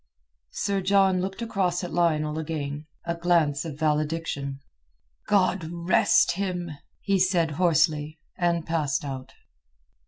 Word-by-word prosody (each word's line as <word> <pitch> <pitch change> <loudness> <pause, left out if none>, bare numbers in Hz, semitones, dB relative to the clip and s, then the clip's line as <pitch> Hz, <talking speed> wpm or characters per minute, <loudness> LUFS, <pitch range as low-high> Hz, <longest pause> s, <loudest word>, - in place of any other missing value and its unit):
Sir 200 - -1
John 190 -1 +3
looked 195 +4 -4
across 190 -6 -1
at 175 - -5
Lionel 155 -3 +1
again—a 150 +1 -5
glance 165 -5 +2
of 150 -3 -6
valediction. 150 -2 -1 0.7
"God 185 -4 +2
rest 170 +1 +3
him!" 180 -2 -3 0.3
he 195 -1 +1
said 180 -3 +2
hoarsely, 155 -2 +1 0.2
and 170 -2 0
passed 150 -4 -1
out. 130 -2 -6
170 Hz, 115 wpm, -26 LUFS, 150-185 Hz, 0.7 s, John